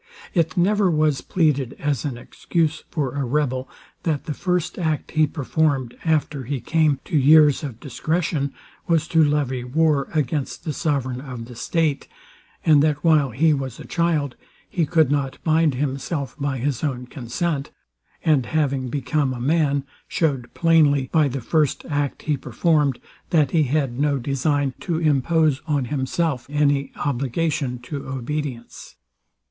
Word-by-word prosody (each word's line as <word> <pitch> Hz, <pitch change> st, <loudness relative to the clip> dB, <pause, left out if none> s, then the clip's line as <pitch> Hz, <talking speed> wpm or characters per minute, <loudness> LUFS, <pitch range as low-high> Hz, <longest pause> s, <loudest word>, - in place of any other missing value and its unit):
It 165 Hz, -2 st, +1 dB
never 200 Hz, +2 st, +3 dB
was 155 Hz, -3 st, +2 dB
pleaded 145 Hz, -7 st, +1 dB
as 145 Hz, -4 st, -1 dB
an 135 Hz, -5 st, -3 dB
excuse 155 Hz, +5 st, -2 dB
for 140 Hz, -5 st, -2 dB
a 140 Hz, -1 st, -1 dB
rebel, 130 Hz, -1 st, -1 dB, 0.3 s
that 155 Hz, -4 st, -1 dB
the 150 Hz, -, -3 dB
first 180 Hz, +1 st, -1 dB
act 155 Hz, -3 st, -1 dB
he 155 Hz, -1 st, +3 dB
performed, 140 Hz, -4 st, 0 dB
after 150 Hz, -4 st, 0 dB
he 140 Hz, +2 st, -2 dB
came 155 Hz, -1 st, +2 dB
to -, -, -4 dB
years 150 Hz, +1 st, +6 dB
of 125 Hz, -6 st, -6 dB
discretion, 150 Hz, +1 st, -1 dB, 0.4 s
was 165 Hz, -2 st, +2 dB
to 160 Hz, -1 st, +5 dB
levy 145 Hz, -4 st, 0 dB
war 145 Hz, +2 st, +1 dB
against 150 Hz, -2 st, -2 dB
the 155 Hz, -, -3 dB
sovereign 130 Hz, -5 st, -1 dB
of 125 Hz, -4 st, -7 dB
the 120 Hz, +1 st, -11 dB
state; 155 Hz, +2 st, 0 dB, 0.6 s
and 150 Hz, -3 st, +6 dB
that 150 Hz, -1 st, +1 dB
while 155 Hz, -4 st, +4 dB
he 155 Hz, +7 st, +3 dB
was 135 Hz, -3 st, -4 dB
a -, -, -9 dB
child 160 Hz, -6 st, 0 dB, 0.3 s
he 165 Hz, -4 st, -1 dB
could 160 Hz, -4 st, +3 dB
not 140 Hz, -2 st, -1 dB
bind 160 Hz, -3 st, +3 dB
himself 140 Hz, +2 st, -3 dB
by 140 Hz, -1 st, -1 dB
his 135 Hz, +1 st, -2 dB
own 130 Hz, -4 st, -2 dB
consent, 140 Hz, +4 st, -3 dB, 0.6 s
and 140 Hz, -7 st, +3 dB
having 140 Hz, -4 st, 0 dB
become 140 Hz, 0 st, -1 dB
a -, -, -6 dB
man, 145 Hz, +1 st, +1 dB, 0.2 s
showed 135 Hz, -7 st, -1 dB
plainly, 150 Hz, -5 st, +3 dB
by 155 Hz, -3 st, +4 dB
the 135 Hz, 0 st, -4 dB
first 150 Hz, +2 st, 0 dB
act 145 Hz, -2 st, -2 dB
he 150 Hz, -, +1 dB
performed, 140 Hz, +2 st, +1 dB, 0.3 s
that 155 Hz, -6 st, +3 dB
he 160 Hz, -3 st, +3 dB
had 135 Hz, -2 st, -1 dB
no 145 Hz, -1 st, +2 dB
design 140 Hz, +1 st, 0 dB
to 170 Hz, -3 st, -2 dB
impose 155 Hz, -1 st, +2 dB
on 145 Hz, -4 st, +1 dB
himself 135 Hz, 0 st, -1 dB
any 145 Hz, -2 st, +1 dB
obligation 135 Hz, 0 st, -1 dB
to 135 Hz, +3 st, -7 dB
obedience. 130 Hz, -1 st, -5 dB
145 Hz, 155 wpm, -22 LUFS, 135-155 Hz, 0.6 s, years